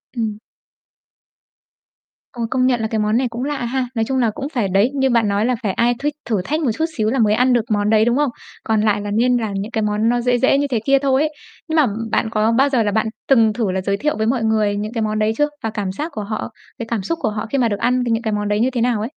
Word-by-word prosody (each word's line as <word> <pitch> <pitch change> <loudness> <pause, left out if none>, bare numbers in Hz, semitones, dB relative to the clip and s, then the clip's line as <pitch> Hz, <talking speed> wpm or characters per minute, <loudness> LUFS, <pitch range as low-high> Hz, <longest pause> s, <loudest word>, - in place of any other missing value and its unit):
Ừm. 220 -3 -2 1.9
Ờ, 240 - -7
công 255 -1 +2
nhận 245 -3 +1
là 220 - 0
cái 220 -1 -2
món 210 +2 +1
này 255 0 +1
cũng 235 +2 -5
lạ 290 0 -2
ha. 255 +1 -1
Nói 225 -1 +1
chung 265 - -1
là 235 -4 +2
cũng 275 +6 -5
phải 235 -6 0
đấy, 195 +5 +3
như 265 -1 +2
bạn 230 -3 +2
nói 200 +2 +1
là 250 +1 +1
phải 200 - +1
ai 240 +4 +2
thích 295 +1 -1 0.2
thử 210 -5 +1
thách 310 +7 -1
một 260 -7 +1
chút 320 - +1
xíu 215 -1 +1
là 265 - 0
mới 210 -2 +3
ăn 250 +3 +3
được 235 -2 +2
món 205 0 +1
đấy, 220 0 +4
đúng 240 +2 +2
không? 295 -1 +2 0.3
Còn 220 -2 +1
lại 210 -1 +1
là 205 0 -4
nên 245 +4 +2
làm 220 -4 -3
những 200 +4 -4
cái 220 - -1
món 210 +2 +1
nó 240 0 +1
dễ 245 0 +2
dễ 265 +2 +3
như 285 0 0
thế 250 -5 0
kia 275 0 +4
thôi 270 0 +2
ấy. 310 0 0 0.4
Nhưng 320 - -1
mà 310 -3 +5 0.3
bạn 220 - +1
có 220 0 +1
bao 265 +5 +3
giờ 255 -5 +2
là 205 - 0
bạn 220 +2 +1 0.2
từng 225 -5 +5
thử 215 -4 -1
là 190 0 -1
giới 200 +1 -1
thiệu 300 +7 -1
với 220 0 0
mọi 240 -2 0
người 215 -2 +1
những 210 +3 -4
cái 230 - -2
món 215 0 -1
đấy 215 +1 +2
chưa? 295 - +3 0.2
Và 225 - -1
cảm 205 -3 -3
giác 300 - -5
của 210 - -3
họ, 215 +3 -4 0.3
cái 230 - -3
cảm 230 -3 -2
xúc 330 - -2
của - - +1
họ 210 0 -4
khi 275 - +1
mà 245 -3 +3
được 205 - -2
ăn 250 +1 +1
cái 235 - -1
những 225 +1 0
cái 220 - -1
món 210 0 -1
đấy 205 +1 0
như 245 - +2
thế 240 -2 -2
nào 240 -3 +1
ấy? 215 - -2
230 Hz, 305 wpm, -19 LUFS, 215-255 Hz, 1.9 s, mà